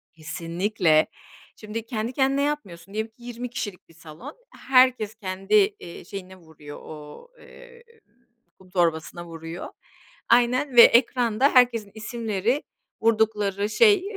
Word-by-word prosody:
Kesinlikle. 165 +1 0 0.5
Şimdi 220 +1 -7
kendi 225 +1 -4
kendine 270 +1 +1
yapmıyorsun 200 - -4
diyelim 220 +1 -3
ki 240 - -19
20 245 0 -6
kişilik 205 -7 -6
bir - - -19
salon. 165 - -12 0.3
Herkes 255 -5 +4
kendi, 195 - -5
eee, 400 - 0
şeyine 190 -1 -9
vuruyor, 160 -4 -13
o 150 - -11
eee, 475 -1 -16 0.8
kum 185 - -19
torbasına 175 -1 -1
vuruyor. 165 +1 -8 0.6
Aynen 245 +3 +2
ve 235 - +11
ekranda 240 +2 +4
herkesin 235 -5 +3
isimleri, 225 +3 -2 0.4
vurdukları 210 -3 +1
şey, 410 - +4
215 Hz, 120 wpm, -24 LUFS, 180-250 Hz, 0.8 s, ve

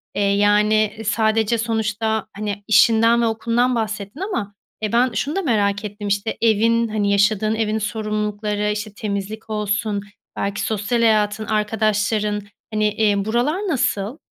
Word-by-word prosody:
eee, 205 - 0
yani, 210 +1 +3
sadece, 220 +1 +1
sonuçta, 220 -1 -1
hani, 205 -1 -4
işinden 230 +2 +5
ve - - +2
okulundan 235 +2 +1
bahsettin 215 +1 -4
ama, 365 - -3 0.3
eee, 215 - -2
ben 240 +1 +2
şunu 290 +7 -2
da 390 - 0
merak 205 - 0
ettim, 205 0 -6
işte, 200 +2 -1
evin, 230 +1 +3
hani, 210 -2 0
yaşadığın 215 +2 +2
evin 220 -1 0
sorumlulukları, 210 -1 -2
işte, 210 0 -4
temizlik 210 +1 -5
olsun, 210 -1 -1 0.3
belki 200 +1 -2
sosyal 220 +3 -1
hayatın, 215 -1 +2
arkadaşların, 210 0 0 0.3
hani, 215 0 +2
eee, 205 -2 +1
buralar 240 +9 +1
nasıl? 240 - -1
215 Hz, 140 wpm, -21 LUFS, 205-225 Hz, 0.3 s, işinden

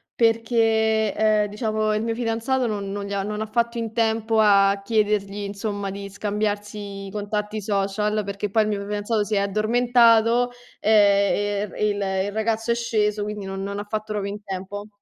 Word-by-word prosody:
perché, 225 -2 +2
ehm, 215 -1 +3
diciamo 215 0 -1
il 215 - 0
mio 225 0 -2
fidanzato 240 +2 0
non 205 -3 -3
non 200 0 -4
gli 200 - -5
ha 200 - 0
non 210 +2 -4
ha 220 - -1
fatto 235 +2 -1
in 225 -1 -3
tempo 225 -1 +1
a 200 -1 +4
chiedergli 210 -2 0
insomma, 200 0 -4
di 200 0 -7
scambiarsi 205 -1 -3
i - - -9
contatti 210 +1 -3
social, 210 +1 0
perché 200 +1 -4
poi 220 +2 +3
il 215 - -2
mio 205 -1 -2
fidanzato 210 +1 -1
si 210 0 -2
è - - +3
addormentato, 230 +3 +3 0.3
ehm, 205 -1 +3
ehm, - - -11
il 205 -1 0 0.3
il 205 - -4
ragazzo 225 +2 -1
è - - +2
sceso, 215 -3 0
quindi 210 -1 -5
non 195 0 -5
non 200 +1 -4
ha 205 - -3
fatto 215 0 -4
proprio 200 -1 -2
in 210 - -8
tempo. 195 +1 -6
210 Hz, 185 wpm, -23 LUFS, 200-220 Hz, 0.3 s, a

